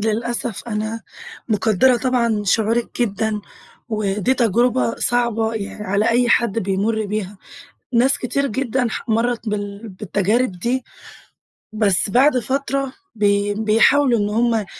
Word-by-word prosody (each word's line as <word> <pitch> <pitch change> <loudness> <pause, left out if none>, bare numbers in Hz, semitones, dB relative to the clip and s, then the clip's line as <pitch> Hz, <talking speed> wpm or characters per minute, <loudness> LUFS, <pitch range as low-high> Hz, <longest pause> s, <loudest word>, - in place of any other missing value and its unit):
للأسف 230 +1 -2
أنا 215 +1 -3 0.5
مُقدرة 220 +4 +3
طبعًا 235 -3 0
شعورِك 225 +5 0
جدًا، 220 -1 -1 0.5
ودِي 210 +2 0
تَجربة 240 +1 +2
صَعبة 230 -2 0
يع 210 -1 -5
على 200 +3 +1
أي 240 +1 +2
حد 230 -2 +2
بيمُر 205 +2 -1
بيها. 205 -1 -4 0.6
ناس 255 +4 +3
كتير 280 +3 -1
جدًا 255 0 -1
ح - - -6
مَرَّت 230 0 0
بال 205 +1 -4
بالتجارب 205 +4 0
دِي، 240 +9 -2 0.9
بَس 205 -2 +1
بَعد 255 +5 +4
فَترة 275 +1 -2 0.2
بي 205 -1 +1
بيحاولوا 225 +4 +3
إن 205 - 0
هم 225 -1 +1
225 Hz, 120 wpm, -20 LUFS, 210-245 Hz, 0.9 s, بَعد